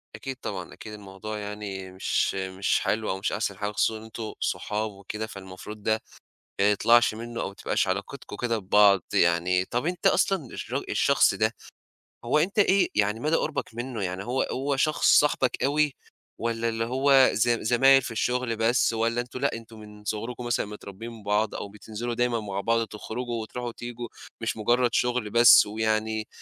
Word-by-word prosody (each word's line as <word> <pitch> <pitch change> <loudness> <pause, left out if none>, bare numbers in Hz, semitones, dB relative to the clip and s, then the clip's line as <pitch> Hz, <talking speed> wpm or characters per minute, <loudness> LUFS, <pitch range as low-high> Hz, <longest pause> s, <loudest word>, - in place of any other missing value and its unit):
أكيد 135 -1 -6
طبعًا 95 -4 -5
أكيد 110 - -10
الموضوع 105 +1 -7
يعني 100 -2 -6
مش 95 +1 0
مش 95 0 0
حلو 110 0 -1
أو 95 - -1
مش 100 - -1
أحسن 100 -3 -2
حاجة 105 0 -2
خصوصًا 110 +2 +1
إن - - -12
أنتم 110 0 -7
صحاب 105 0 -2
وكده 105 +3 -6
فالمفروض 100 +1 -10
ده 110 0 +1 0.6
ما 100 +1 +5
يطلعش 115 +2 +4
منُّه 115 +1 -6
أو - - -2
ما 100 - -9
تبقاش 100 - 0
علاقتكم 100 +8 -4
كده 115 -2 -1
ببعض. 100 -1 +4
يعني 90 +2 +3
طَب 120 +5 -2
أنت 175 -1 +1
أصلًا 190 -8 +2
الچ - - -6 0.2
الشخص - - +3
ده، - - 0 0.7
هو 125 +5 +2
أنت 190 +7 0
إيه 200 -1 +4
يعني 105 +2 +1
مدى 155 +4 +2
قُربك 150 -7 -3
منُّه؟ 120 -3 -4
يعني 95 +1 -3
هو 125 +3 0
هو 135 +1 -1
شخص 155 +2 +1
صاحبك 140 -3 0
أوي 145 0 +2 0.4
والّا 115 0 -1
اللي 115 0 -1
هو 135 +2 +5
زم 120 +1 +1
زمايل 135 +4 +5
في 120 - -5
الشُغل 120 +1 -1
بس؟ 115 +1 +2
والّا 115 +1 0
أنتم 125 +1 -7
لأ، 140 - +1
أنتم 115 -1 -10
من 105 0 -13
صُغركم 115 +4 -4
مثلًا 120 -3 0
متربيين 105 +2 -9
بعض 105 +2 0
أو - - -5
بتنزِلوا 110 +3 -6
دايمًا 120 -1 0
مع 100 -2 -4
بعض 115 +2 +1
تخرُجوا 115 +2 -5
وتروحوا 120 +2 -5
وتيجوا؟ 120 0 -7 0.3
مش 115 - -2
مجرّد 120 +2 +2
شُغل 125 -3 0
بس 120 -1 +8
ويعني 110 0 -1
110 Hz, 175 wpm, -26 LUFS, 105-120 Hz, 0.7 s, بس